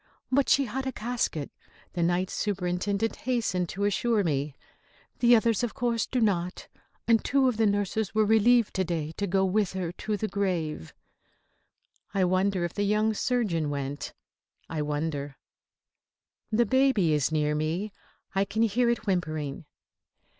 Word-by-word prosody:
"But 275 +1 +3
she 275 - +4
had 265 +3 -4
a - - -1
casket," 230 - -2 0.4
the 175 - -2
Night 175 +2 +1
Superintendent 200 +2 -1
hastened 225 -8 -1
to 200 - -4
assure 210 +1 +2
me. 145 -3 -1 0.6
"The 240 0 +6
others, 230 0 +2
of 240 - -2
course, 235 -2 0
do 255 - -1
not. 180 -5 0 0.4
And 230 -1 +4
two 275 -1 +3
of 245 -4 0
the 225 -1 +3
nurses 205 +1 -1
were 215 0 +4
relieved 225 +2 +4
to 190 - +2
day 165 -3 -3
to 200 - -1
go 190 +1 +2
with 195 0 +1
her 180 -3 -3
to 210 +4 -3
the 215 - -2
grave." 175 - -2 1.2
I 195 - +3
wonder 185 0 +1
if 175 - -5
the 205 - -2
young 210 +2 +2
surgeon 205 - 0
went. 140 0 -4 0.6
I 160 -2 -3
wonder 145 -2 -3 1.1
The 235 +2 +3
baby 250 - +3
is 150 0 +1
near 150 -1 +1
me. 165 +7 -2 0.4
I 195 0 +2
can 220 +3 0
hear 235 +2 +2
it 235 -2 -1
whimpering. 155 -7 -2
200 Hz, 155 wpm, -27 LUFS, 170-225 Hz, 1.2 s, The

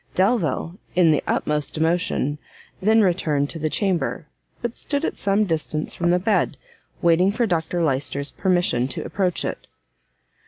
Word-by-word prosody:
Delvile, 185 - +1 0.2
in 175 -3 +5
the 150 - +1
utmost 150 0 -1
emotion, 160 -3 0 0.4
then 220 +3 +4
returned 155 -7 +1
to 165 - -5
the 155 0 0
chamber; 180 -3 -1 0.3
but 240 -1 -4
stood 285 +1 -2
at - - -2
some 200 +1 +2
distance 155 -3 -2
from 175 0 0
the 175 - +4
bed, 185 -6 +1 0.5
waiting 170 +2 +4
Dr 175 -6 0
Lyster's 140 -1 -1
permission 175 -10 +1
to 135 - -5
approach 185 -3 -1
it. - - -5
175 Hz, 145 wpm, -23 LUFS, 155-190 Hz, 0.5 s, in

